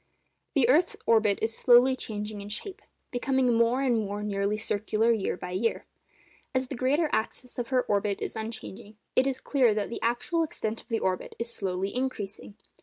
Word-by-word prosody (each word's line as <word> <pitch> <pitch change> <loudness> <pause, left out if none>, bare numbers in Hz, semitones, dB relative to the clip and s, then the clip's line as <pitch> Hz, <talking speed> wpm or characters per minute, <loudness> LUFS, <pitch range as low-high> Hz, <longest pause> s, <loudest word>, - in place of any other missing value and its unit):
The 265 -5 +4
earth's 315 +8 +3
orbit 215 -3 +4
is 225 0 0
slowly 250 +2 +6
changing 210 -3 -5
in 200 - -8
shape—becoming 260 - -2
more 235 +3 +3
and 245 -4 +2
more 205 0 -3
nearly 200 0 0
circular 220 +1 +1
year 215 -5 0
by 180 - -6
year. 215 +5 -1 0.7
As 260 0 0
the - - -4
greater 275 +6 +2
axis 245 +3 -3
of 240 - -2
her 255 -1 +2
orbit 200 -1 0
is - - -4
unchanging, 220 -1 -7 0.2
it 260 - +4
is 265 -1 -1
clear 250 -7 +2
that 210 0 -2
the - - -5
actual 240 +9 0
extent 225 -8 -2
of - - -27
the 230 - 0
orbit 185 -4 -2
is 235 0 -1
slowly 190 0 -2
increasing. 210 -6 -4
230 Hz, 180 wpm, -28 LUFS, 210-255 Hz, 0.7 s, slowly